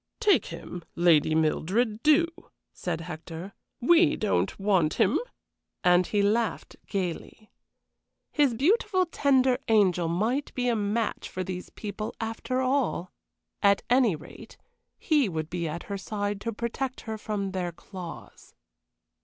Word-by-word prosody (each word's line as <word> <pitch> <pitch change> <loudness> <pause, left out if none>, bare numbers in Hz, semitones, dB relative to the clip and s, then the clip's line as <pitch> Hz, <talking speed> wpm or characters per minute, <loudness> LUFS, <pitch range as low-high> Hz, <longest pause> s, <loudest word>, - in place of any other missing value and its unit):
"Take 425 -4 +3
him, 175 -1 -8
Lady 160 -3 +4
Mildred, 205 +8 +1
do," 310 +2 +5 0.5
said 170 -2 -3
Hector; 165 +3 -7 0.3
"we 340 +5 +5
don't 90 - 0
want 190 -6 +2
him," - - +3 0.6
and 180 0 +4
he 205 -1 +1
laughed 220 +2 0
gayly. 195 +2 -4 0.8
His 285 -5 +2
beautiful, 370 - +2
tender 265 -6 +2
angel 190 -6 +3
might 220 - 0
be 250 -1 +1
a 235 - +2
match 210 +1 -1
for 185 - -4
these 180 0 -6
people 215 0 -6
after 225 +3 -2
all. 255 -8 0 0.5
At 200 -1 +4
any 245 -7 +4
rate, 150 - -12 0.4
he 295 - +2
would 160 -2 -4
be 170 -1 -2
at 160 +2 -5
her 200 -1 -5
side 205 0 -3
to 230 - -2
protect 240 +4 -3
her 220 -1 -5
from 205 -3 -3
their 180 -2 -2
claws. 175 0 -10
205 Hz, 135 wpm, -27 LUFS, 180-250 Hz, 0.8 s, do